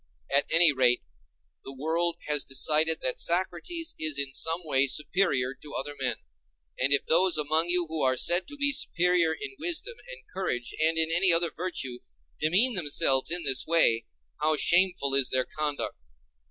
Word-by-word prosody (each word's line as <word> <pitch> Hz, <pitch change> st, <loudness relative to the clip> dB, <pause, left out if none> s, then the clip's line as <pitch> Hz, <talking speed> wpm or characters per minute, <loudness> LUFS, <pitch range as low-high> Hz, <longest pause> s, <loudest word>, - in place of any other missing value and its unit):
At 140 Hz, -, +2 dB
any 165 Hz, -1 st, +5 dB
rate, 125 Hz, -2 st, +2 dB, 0.6 s
the 135 Hz, -, -11 dB
world 165 Hz, +4 st, -1 dB
has 150 Hz, -2 st, +1 dB
decided 155 Hz, +4 st, +2 dB
that 130 Hz, -, -2 dB
Socrates 190 Hz, -, -2 dB
is 155 Hz, -2 st, -1 dB
in 140 Hz, -1 st, -3 dB
some 165 Hz, +5 st, 0 dB
way 140 Hz, -2 st, +1 dB
superior 140 Hz, -4 st, -1 dB
to 145 Hz, +2 st, -13 dB
other 145 Hz, +2 st, -4 dB
men. 130 Hz, -2 st, -2 dB, 0.6 s
And 130 Hz, +2 st, 0 dB
if 140 Hz, -, +2 dB
those 180 Hz, +2 st, +4 dB
among 155 Hz, +3 st, +1 dB
you 175 Hz, 0 st, +2 dB
who 160 Hz, -1 st, -4 dB
are 130 Hz, -1 st, +1 dB
said 175 Hz, +6 st, +3 dB
to 290 Hz, 0 st, -8 dB
be 285 Hz, 0 st, +2 dB
superior 180 Hz, -, +1 dB
in 410 Hz, -, -6 dB
wisdom 350 Hz, +8 st, -3 dB
and -, -, -13 dB
courage, 150 Hz, -10 st, -3 dB
and 160 Hz, +1 st, +1 dB
any 165 Hz, +3 st, +3 dB
other 170 Hz, 0 st, +2 dB
virtue, 135 Hz, -8 st, -5 dB, 0.4 s
demean 195 Hz, +11 st, +2 dB
themselves 145 Hz, -6 st, +1 dB
in 175 Hz, +1 st, -1 dB
this 135 Hz, -3 st, +1 dB
way, 155 Hz, -9 st, +2 dB, 0.3 s
how 155 Hz, +1 st, +1 dB
shameful 175 Hz, -3 st, +2 dB
is 135 Hz, -2 st, +2 dB
their 130 Hz, -1 st, 0 dB
conduct! 145 Hz, -, -5 dB
160 Hz, 165 wpm, -26 LUFS, 140-180 Hz, 0.6 s, any